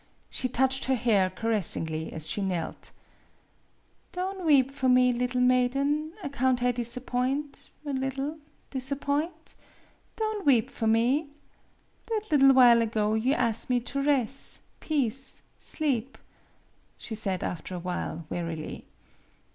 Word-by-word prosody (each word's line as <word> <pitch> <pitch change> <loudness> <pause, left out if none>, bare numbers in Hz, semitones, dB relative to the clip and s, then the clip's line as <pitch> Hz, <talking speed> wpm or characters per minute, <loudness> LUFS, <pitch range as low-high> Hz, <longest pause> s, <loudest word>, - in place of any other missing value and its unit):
She 255 - -1
touched 265 +2 +1
her 265 - +2
hair 215 -6 +2
caressingly 185 -6 0
as 155 -1 -2
she 205 - -1
knelt. 180 -4 -3 0.6
" - - -39
Don' 375 +1 -3
weep 275 -3 +5
for 260 -2 0
me, 250 0 +5
liddle 250 +1 -1
maiden 275 +5 +2
ac 280 - -4
count 255 -2 +1
I 250 - +4
disappoint 250 +4 -2 0.2
a 285 - -3
liddle 270 +3 -3 0.3
disappoint 285 +5 -2 0.6
Don' 435 -2 -2
weep 245 -6 +3
for 225 - -2
me. 245 +7 +2 0.8
That 445 -2 -1
liddle 275 -2 +6
while 240 -3 +7
ago 215 -2 0
you 240 +6 +2
as' 230 -2 0
me 250 -1 +3
to 275 +3 -3
res' 275 -2 0 0.2
peace 270 -3 -1 0.2
sleep," 270 -5 -1 0.8
she 225 - -7
said 195 -4 -2
after 180 +2 -4
a - - -4
while, 170 -2 -4
wearily. 165 -2 -5
255 Hz, 130 wpm, -28 LUFS, 225-280 Hz, 0.8 s, while